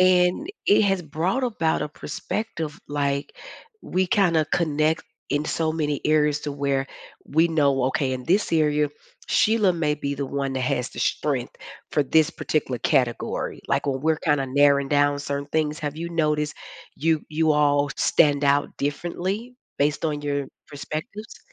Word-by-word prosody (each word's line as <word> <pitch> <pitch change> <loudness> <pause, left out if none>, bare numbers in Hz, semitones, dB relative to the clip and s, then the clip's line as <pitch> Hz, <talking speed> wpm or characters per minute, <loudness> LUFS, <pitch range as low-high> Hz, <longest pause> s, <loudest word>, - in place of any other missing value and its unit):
And 185 - +4 0.2
it 205 - +5
has 195 -3 +1
brought 170 - -1
about 170 -12 0
a 150 - -3
perspective 165 0 -5
like, 140 -1 -1 0.5
we 185 +1 0
kinda 175 -6 +3
connect 155 -1 +1 0.3
in 145 +1 0
so 160 +1 0
many 150 -3 -1
areas 150 -1 +3
to 150 - -4
where 140 -1 -1 0.4
we 160 +3 +3
know, 140 -5 +2
"Okay, 130 0 0
in 125 -1 -6
this 190 +6 +2
area, 150 -2 +2 0.4
Sheila 215 -5 +3
may 155 -3 0
be 140 -1 -3
the 140 0 -3
one 135 0 -3
that 130 - -1
has 125 0 0
the - - -11
strength 135 -4 -1 0.4
for 150 - +2
this 155 +3 +3
particular 130 -5 -2
category," 120 -3 0
like, - - 0
when 135 -1 -1
we're 160 +2 +2
kinda 145 -4 0
narrowing 140 +1 +3
down 145 0 +2
certain 140 0 -3
things, 155 0 0
have 150 0 -4
you 170 +1 -4
noticed 150 -3 0 0.4
you 160 0 +1
you 155 0 +2
all 145 -1 +2
stand 145 -2 +3
out 140 +1 +2
differently 180 - -3 0.2
based 145 +3 +1
on 150 -2 -1
your 140 -1 -1 0.2
perspectives? 160 - -7
150 Hz, 160 wpm, -24 LUFS, 140-165 Hz, 0.5 s, it